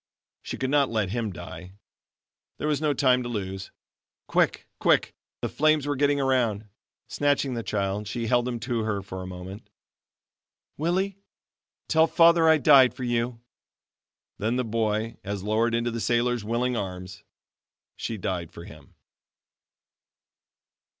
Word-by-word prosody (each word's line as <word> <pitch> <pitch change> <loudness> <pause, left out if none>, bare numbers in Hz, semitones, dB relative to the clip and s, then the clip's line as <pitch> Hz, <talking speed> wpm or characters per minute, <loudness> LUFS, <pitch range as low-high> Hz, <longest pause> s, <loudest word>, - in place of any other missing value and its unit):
She - - -6
could 130 0 -2
not 145 -2 +3
let 110 -5 -1
him 115 -2 -2
die. 90 +2 -9 0.8
There - - -2
was 150 -1 0
no 155 -1 +2
time 130 -3 +3
to 120 - -5
lose. 95 -4 -4 0.6
Quick! - - +1
quick! - - +3 0.3
The - - -1
flames 155 -1 +2
were 145 0 -1
getting 145 +1 +2
around. 120 -6 +1 0.4
Snatching 145 -2 0
the 115 - -2
child, 100 -1 -2
she 115 +3 -3
held 120 +1 +2
him 120 -2 -3
to 120 0 -1
her 110 -2 -1
a 95 -1 -6
moment. 90 +3 -9 1.1
"Willie, 185 +5 -1 0.7
tell 160 0 +4
Father 170 -1 +5
I 160 - +6
died 140 -4 +6
for 130 - -6
you!" 120 -1 -1 1.0
Then 110 +4 0
the 125 -1 0
boy 110 0 -1
as 100 -1 -4
lowered 115 +3 +1
into 120 0 0
the 115 0 -4
sailor's 120 0 +1
willing 120 +3 0
arms. 95 -2 -6 0.7
She 115 - -4
died 90 -3 -3
for 85 - -10
him. 75 -3 -14
115 Hz, 145 wpm, -26 LUFS, 100-135 Hz, 1.1 s, I